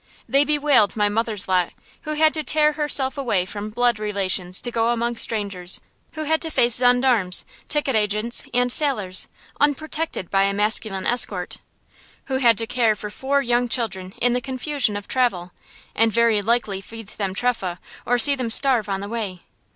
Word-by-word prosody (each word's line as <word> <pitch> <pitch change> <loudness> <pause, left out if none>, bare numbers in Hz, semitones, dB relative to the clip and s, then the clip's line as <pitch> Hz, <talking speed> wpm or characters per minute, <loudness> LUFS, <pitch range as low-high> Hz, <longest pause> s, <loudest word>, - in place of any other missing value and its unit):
They 275 +1 +3
bewailed 290 -7 +2
my 210 -1 +1
mother's 215 -1 +1
lot, 180 -2 0 0.3
who 305 - -3
had 310 +1 +2
to 310 - -2
tear 300 0 +2
herself 290 -2 0
away 215 -9 0
from 205 +2 -7
blood 240 0 0
relations 195 -3 -1
to 240 - -3
go 230 0 0
among 235 0 -2
strangers; 200 -6 0 0.3
who 310 - -5
had 315 +1 0
to 325 - -2
face 240 -6 +4
gendarmes, 245 -7 +2 0.2
ticket 295 -4 0
agents, 215 +2 0
and 245 0 0
sailors, 215 - +2 0.3
unprotected 295 - -2
by 195 - +2
a 200 0 -1
masculine 210 -2 +1
escort; 200 -7 0 0.7
who 265 - -2
had 235 -4 +3
to 230 - -2
care 225 -2 +1
for 210 0 -8
four 275 +4 -1
young 240 0 0
children 195 -7 -4
in 245 0 +1
the 250 - -1
confusion 260 -3 -1
of 205 - -9
travel, 195 -9 -1 0.4
and 225 0 +2
very 230 -2 +2
likely 210 -3 -1
feed 225 +1 -10
them 195 -3 -4
trefah 195 -7 -2 0.3
or 245 - 0
see 260 +4 +7
them 255 -4 -3
starve 235 -3 +4
on 195 0 -3
the 200 - -6
way. 205 -5 -5
230 Hz, 175 wpm, -21 LUFS, 205-260 Hz, 0.7 s, see